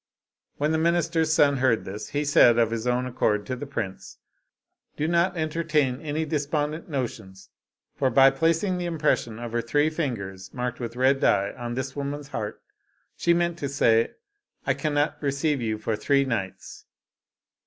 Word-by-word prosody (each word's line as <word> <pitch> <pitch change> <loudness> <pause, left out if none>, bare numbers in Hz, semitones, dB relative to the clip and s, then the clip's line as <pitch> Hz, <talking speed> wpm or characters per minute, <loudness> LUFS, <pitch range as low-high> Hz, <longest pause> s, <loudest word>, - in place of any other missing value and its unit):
When 150 +2 +1
the 160 - +1
minister's 165 -1 +1
son 145 -3 +4
heard 125 -4 +2
this, 100 +3 -6
he 145 +1 -1
said, 120 -5 +6
of 115 -1 +3
his 115 +1 -3
own 125 +1 +1
accord, 105 -4 0
to 130 - -3
the 140 +3 -7
prince, 110 -8 -5 0.4
" - - -49
Do 155 - 0
not 175 +2 +2
entertain 155 -4 0
any 155 0 -2
despondent 150 +2 -2
notions, 95 -9 -5 0.4
for 135 -2 +1
by 135 0 +6
placing 165 +6 +1
the 175 - -2
impression 150 -9 0
of 120 -1 -6
her 120 0 0
three 145 +6 +1
fingers 100 - -4
marked 125 0 -3
with 120 -1 -5
red 130 +2 +3
dye 100 -4 +2
on 120 0 -5
this 130 +1 -4
woman's 145 0 -4
heart, 110 -5 -5 0.5
she 170 - +1
meant 170 0 +1
to 140 - -3
say: 115 -5 +2 0.5
'I - - +2
cannot 150 0 -1
receive 140 0 0
you 110 -2 -1
for 110 0 -2
three 140 +5 +2
nights.' 105 -7 -5
140 Hz, 170 wpm, -25 LUFS, 115-155 Hz, 0.5 s, said